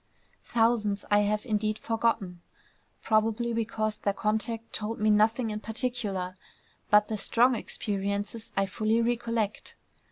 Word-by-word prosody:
Thousands 225 -3 +1
I 205 - +6
have 210 +2 0
indeed 215 -2 0
forgotten, 220 -7 -1 0.6
probably 225 +2 +1
because 215 -1 -1
their 200 -1 0
contact 220 +2 -2
told 220 +1 -3
me 215 0 +3
nothing 220 +2 +3
in 210 - -3
particular; 215 -6 -2 0.5
but 210 0 +5
the 220 - -3
strong 240 +5 +3
experiences 205 0 -3
I 195 - +3
fully 215 +4 0
recollect. 230 -2 -1
215 Hz, 125 wpm, -28 LUFS, 210-230 Hz, 0.6 s, I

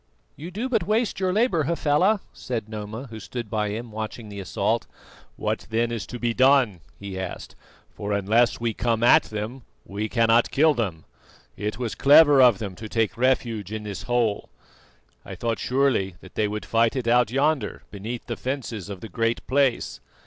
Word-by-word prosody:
"You 160 +4 -8
do 215 +8 -3
but 225 -9 0
waste 215 0 +1
your 185 -1 +1
labour, 190 - +2
Hafela," 170 +6 +2
said 115 -4 -4
Noma, 110 +3 -6
who 110 - -7
stood 115 0 -6
by 105 -1 0
him 115 +2 -5
watching 110 +1 -6
the 100 -1 -7
assault. 95 -2 -1 0.5
"What - - -3
then 115 +1 0
is 115 -4 -4
to 120 - -6
be 120 -1 -1
done?" 130 -6 +4 0.2
he 100 -2 -6
asked, 95 -2 -6 0.4
"for 105 0 -5
unless 105 +4 +2
we 115 -1 -1
come 115 +1 0
at 155 +6 +6
them 110 +4 -5 0.2
we 105 +2 -4
cannot 115 -1 +3
kill 155 +2 +4
them. 95 - -3 0.5
It 105 0 -3
was 120 -3 -3
clever 145 -1 +7
of 120 -5 +6
them 100 -2 -5
to 110 0 -8
take 115 -2 0
refuge 115 -5 0
in 110 -1 -4
this 100 -3 -6
hole. 120 -4 0 0.7
I - - -8
thought 115 -2 -2
surely 125 -8 +1
that 95 - -14
they 105 - +1
would 105 +1 -4
fight 115 +1 +2
it 125 -3 -2
out 120 -1 +4
yonder, 135 -2 0
beneath 110 +4 -6
the 120 - -4
fences 125 -7 -4
of 95 -3 -7
the - - -7
Great 115 +1 -1
Place." 135 - +1
115 Hz, 185 wpm, -24 LUFS, 105-135 Hz, 0.7 s, clever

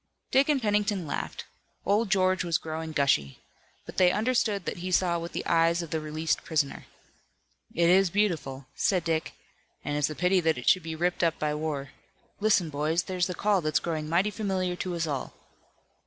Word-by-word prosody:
Dick 275 +3 +4
and 290 -2 +3
Pennington 205 -4 0
laughed. 145 - -4 0.4
Old 210 +2 +2
George 185 -1 +2
was 170 -2 +1
growing 160 -1 -5
gushy. 135 - +1 0.5
But - - -10
they 185 -1 +6
understood 215 -4 0
that - - -3
he 180 +1 -4
saw 175 -1 +2
with 170 +1 -6
the - - -4
eyes 170 +1 +2
of 165 - -9
the 160 - 0
released 155 +1 -2
prisoner. 150 -4 -1 0.9
"It 170 0 +3
is 185 +1 +5
beautiful," 165 -9 -1
said 185 -4 +1
Dick, 165 -1 -1 0.5
"and 145 - -1
it's 150 0 +1
a 155 - -5
pity 180 +3 +2
that 160 -4 +1
it 125 - -7
should 185 - +5
be 160 -1 -5
ripped 175 +2 0
up 165 -1 +2
by 150 -1 -1
war. 150 -3 -3 0.5
Listen, 205 -6 +2
boys, 155 +4 0
there's 185 -1 -1
the 180 - -4
call 205 -1 +2
that's 155 -1 +1
growing 155 -3 -3
mighty 185 +6 +2
familiar 190 -4 -1
to 180 -1 -3
us 170 -1 -1
all!" 145 -4 -4
170 Hz, 190 wpm, -28 LUFS, 155-190 Hz, 0.9 s, they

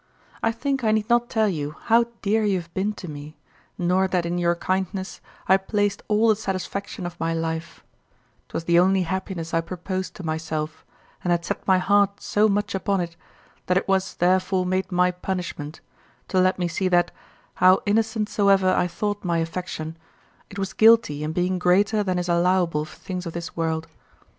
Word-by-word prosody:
I 225 - +2
think 270 +3 -2
I 215 - +3
need 215 -1 0
not 240 0 +3
tell 220 -1 +2
you 150 -5 -3
how 235 +1 +4 0.2
dear 215 +2 +2
you 200 -3 +2
have 170 -1 -12
been 195 +3 0
to 195 - -9
me, 150 0 -9 0.4
nor 185 +2 +2
that 180 -2 0
in 175 +1 -1
your 170 0 +2
kindness 190 +1 -3 0.3
I 190 - +6
placed 205 +1 -1
all 215 +2 +3
the 215 - +5
satisfaction 200 -1 -4
of 175 0 -7
my 165 0 -1
life; 165 0 -4 0.7
'twas - - -4
the 170 +1 +4
only 190 +1 +3
happiness 185 -2 -4
I 165 - +3
proposed 185 +2 -5
to 190 - -9
myself, 155 -1 -3 0.4
and 180 - -1
had 170 -1 +1
set - - -4
my 190 -1 +5
heart 200 +1 +2
so 215 +1 +2
much 205 0 0
upon 195 0 0
it 170 -1 -4 0.5
that 180 - +3
it - - -1
was 190 -1 0
therefore 185 +1 +2
made 185 +1 -1
my 180 0 +3
punishment, 175 -4 -5 0.5
to 185 - +2
let 185 +1 +3
me 180 -1 0
see 185 +2 -1
that, 175 -1 +3 0.5
how 185 +1 +6
innocent 220 +1 +1
soever 195 -3 +3
I 180 - +2
thought 205 +3 -3
my 170 -2 0
affection, 165 -1 -4 0.5
it 200 - -10
was 195 -1 -3
guilty 220 -10 +5
in 155 - -2
being 180 +2 0
greater 195 +4 +3
than 185 -3 -1
is 175 0 -2
allowable 175 -3 +2
for 155 - -14
things 180 -1 -5
of 165 - -6
this 170 -1 -6
world. 160 -1 -1
185 Hz, 190 wpm, -24 LUFS, 170-200 Hz, 0.7 s, I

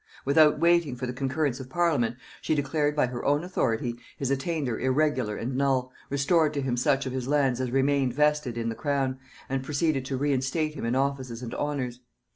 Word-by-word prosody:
Without 150 +2 +5
waiting 170 -5 +3
for 125 +1 -4
the 125 - -4
concurrence 135 +1 -1
of 130 -1 -8
parliament, 150 -8 +1 0.3
she 155 - 0
declared 145 +1 0
by 145 - +3
her 125 -1 -5
own 145 +3 +2
authority 120 -9 -1 0.2
his 135 -1 -2
attainder 140 -3 -1
irregular 130 -5 +1
and 125 +3 -3
null, 130 -2 +1 0.2
restored 150 +2 +2
to 140 - 0
him 130 -2 -1
such 135 +3 +1
of 130 - -3
his 130 -1 -3
lands 135 -3 +2
as 130 - -1
remained 135 0 +2
vested 150 -4 +1
in 115 0 -1
the - - -2
crown, 135 -1 -1 0.3
and 135 0 -1
proceeded 145 0 0
to 130 0 -2
reinstate 145 +3 0
him 140 - -5
in 120 +2 0
offices 130 -3 -1
and 120 - -6
honors. 130 -5 -2
135 Hz, 195 wpm, -27 LUFS, 125-150 Hz, 0.3 s, Without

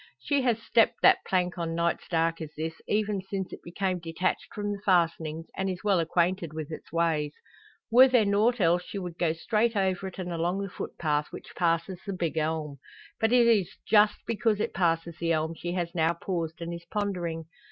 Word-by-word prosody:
She 285 -2 0
has 240 -3 +1
stepped 230 0 +2
that - - +6
plank 180 -1 0
on 165 -1 -2
nights 170 0 0
dark 165 -1 +1
as 155 - -5
this, 160 +1 -4
even 210 -2 0
since 190 0 -5
it - - -9
became 185 +1 -2
detached 165 +2 -2
from 205 0 -3
the 200 -1 -5
fastenings, 165 -4 +1
and 190 0 -1
is 185 -1 -5
well 200 -4 +3
acquainted 170 0 0
with 155 0 -5
its 155 - -8
ways. 160 -3 0 0.6
Were 255 +3 +8
there 245 -4 +4
nought 215 +4 +2
else, 175 -1 +3
she 200 - -7
would 180 -3 -6
go 165 -3 +2
straight 220 +7 0
over 190 -1 0
it, 185 - -9
and 180 -2 -4
along 175 +4 -1
the 195 - -5
footpath, 150 -4 -2
which - - -10
passes 170 +1 0
the 200 - -4
`big 175 -3 -2
elm.' 155 -2 -2 0.4
But 225 0 +2
it 245 -1 +6
is 205 -6 +2
just 210 -1 +5
because 225 -2 +1
it - - -1
passes 170 -2 0
the 165 0 +1
elm 160 +1 0
she 175 +1 -5
has 175 -2 -2
now 165 -1 +2
paused 170 -3 -4
and 170 +1 -4
is 170 0 -8
pondering. 175 -6 -2
175 Hz, 205 wpm, -28 LUFS, 165-200 Hz, 0.6 s, Were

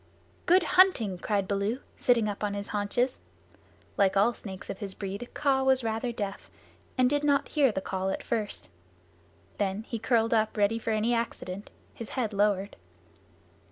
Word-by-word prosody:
"Good 365 +1 +6
hunting!" 320 - +4
cried 200 -1 0
Baloo, 200 +5 -1 0.2
sitting 235 -3 +2
up 205 0 -4
on 205 -1 -1
his 200 0 -5
haunches. 225 +5 0 0.8
Like 195 -1 +3
all 215 +5 +4
snakes 190 -4 -9
of 195 - -6
his 195 -3 -5
breed 200 +4 -5
Kaa 275 -2 +2
was 265 -1 +3
rather 225 +2 -1
deaf, 205 -4 -5 0.5
and 255 -1 +5
did 290 +2 +1
not 285 -1 +2
hear 280 -5 +3
the 190 - -3
call 190 0 -2
at - - -3
first. 220 -3 -3 0.9
Then 200 +1 -1
he 230 0 -5
curled 230 0 +2
up 220 -1 +1
ready 210 +2 +2
for 230 - -4
any 220 +2 +1
accident, 205 -4 -3 0.2
his 230 - -8
head 225 -4 0
lowered. 200 -1 +1
220 Hz, 165 wpm, -28 LUFS, 200-245 Hz, 0.9 s, Good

